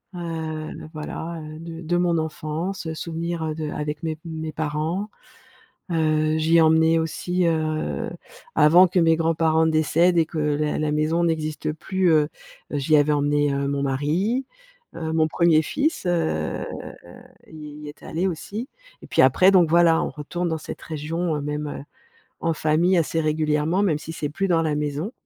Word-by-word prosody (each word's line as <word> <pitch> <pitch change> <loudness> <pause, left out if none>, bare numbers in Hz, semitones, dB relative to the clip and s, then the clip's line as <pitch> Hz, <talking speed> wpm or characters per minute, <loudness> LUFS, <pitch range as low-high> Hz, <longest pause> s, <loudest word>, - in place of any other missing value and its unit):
Heu, 160 -2 -4
le - - -9
voilà, 160 +2 -6
heu 155 0 -9
de 165 0 -8
de 175 +1 0
mon 175 -1 +2
enfance, 160 +4 -3
heu, 160 - -3
souvenirs 165 0 -3
de 155 -1 -4
avec 150 0 -4
mes 160 -1 -2
mes 160 -2 -5
parents. 155 +7 -2 0.8
Heu, 155 -1 +1
j'y 160 +1 +3
ai - - +6
emmené 160 +1 +4
aussi, 175 +3 -1
heu, 155 -1 -1 0.5
avant 175 +5 +7
que 180 +1 +1
mes 165 -1 +4
grands-parents 160 0 +2
décèdent, 160 +3 +3
et 165 - +4
que 160 0 -5
la 150 0 0
la 155 -1 0
maison 155 +3 +1
n'existe 155 -2 -1
plus, 185 +4 0
heu, 155 -2 +4 0.4
heu, - - 0
j'y 155 +3 +3
avais 145 +1 +3
emmené, 145 0 +1
heu, 140 0 -1
mon 140 0 -1
mari, 160 - 0 0.5
heu, 160 -1 -3
mon 160 -1 +3
premier 160 0 +3
fils, 290 - -1
heu, 170 -2 -1 0.8
il 150 -2 -10
y 150 - -8
est 145 - -14
allé 175 +4 -1
aussi 205 - -5 0.3
et - - -12
puis - - +3
après, 185 +1 +5
donc 180 -4 +5
voilà, 170 0 +5
on - - -2
retourne 175 +4 -4
dans 160 - -1
cette - - -8
région, 160 +2 -3
heu, - - -4
même, 150 +1 -3
heu, 145 - -6 0.6
en 165 0 +1
famille, 160 +4 +2
assez 165 0 +1
régulièrement, 155 +3 +1
même 160 -7 +1
si 160 - -8
c'est 150 -2 -3
plus 195 +6 -1
dans 170 -3 +3
la 155 -2 0
maison. 150 +6 -2
160 Hz, 180 wpm, -23 LUFS, 150-170 Hz, 0.8 s, avant